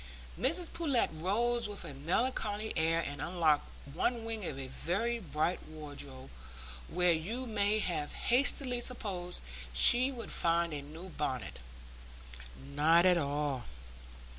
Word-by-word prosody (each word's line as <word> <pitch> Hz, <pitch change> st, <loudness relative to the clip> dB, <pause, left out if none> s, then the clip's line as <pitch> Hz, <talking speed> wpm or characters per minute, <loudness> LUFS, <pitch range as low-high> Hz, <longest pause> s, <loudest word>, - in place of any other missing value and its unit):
Mrs 330 Hz, +7 st, -1 dB
Pullet 290 Hz, -8 st, 0 dB
rose 220 Hz, +8 st, 0 dB
with 205 Hz, -, -6 dB
a 145 Hz, -, -7 dB
melancholy 210 Hz, -, -1 dB
air 165 Hz, 0 st, +2 dB
and 145 Hz, -3 st, -5 dB
unlocked 165 Hz, -4 st, +1 dB, 0.2 s
one 230 Hz, +7 st, 0 dB
wing 225 Hz, -2 st, -4 dB
of 140 Hz, -, -4 dB
a 135 Hz, -, -5 dB
very 215 Hz, -, -2 dB
bright 170 Hz, -2 st, -1 dB
wardrobe, 145 Hz, -4 st, -8 dB, 0.6 s
where 180 Hz, 0 st, +2 dB
you 205 Hz, +11 st, -2 dB
may 210 Hz, -2 st, +1 dB
have 160 Hz, -8 st, -2 dB
hastily 250 Hz, 0 st, +2 dB
supposed 190 Hz, -8 st, -3 dB, 0.3 s
she 245 Hz, -, +8 dB
would 240 Hz, -3 st, -7 dB
find 170 Hz, -1 st, +1 dB
a 145 Hz, -, -4 dB
new 160 Hz, +6 st, -10 dB
bonnet. 135 Hz, -7 st, -4 dB, 1.0 s
Not 150 Hz, +5 st, +3 dB
at 180 Hz, -2 st, +5 dB
all. 145 Hz, -3 st, -2 dB
175 Hz, 130 wpm, -32 LUFS, 150-230 Hz, 1.0 s, she